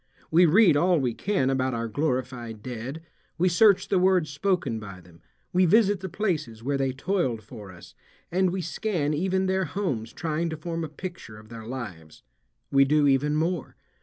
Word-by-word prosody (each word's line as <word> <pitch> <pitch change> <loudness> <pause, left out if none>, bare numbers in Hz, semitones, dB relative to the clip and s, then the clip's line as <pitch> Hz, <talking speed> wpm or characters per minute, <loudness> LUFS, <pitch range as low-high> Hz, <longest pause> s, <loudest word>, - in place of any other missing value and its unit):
We 175 +2 +6
read 180 -1 +5
all 175 +2 +3
we 125 -4 0
can 185 - 0
about 130 -1 0
our 115 0 -2
glorified 125 -4 -3
dead, 130 +6 -6 0.3
we 180 +2 +2
search 195 +2 +4
the 190 - +3
words 180 -4 +2
spoken 145 - -1
by 100 -4 -9
them, 85 -1 -19 0.3
we 180 0 +4
visit 205 +1 +4
the 190 0 -6
places 155 - -2
where 140 +3 0
they 135 -1 0
toiled 130 - -1
for 105 -2 -11
us, 90 -1 -14 0.4
and 185 +1 +2
we 185 +1 -2
scan 165 -3 -1
even 190 +4 0
their 190 0 +1
homes 140 - -3
trying 165 0 -2
to 160 - -5
form 165 +1 -4
a 160 - -4
picture 165 - -8
of 110 0 -15
their 115 -1 -9
lives. 95 -12 -8 0.5
We 135 0 +6
do 150 +2 +3
even 145 +2 +2
more. 165 0 -2
150 Hz, 185 wpm, -26 LUFS, 120-180 Hz, 0.5 s, We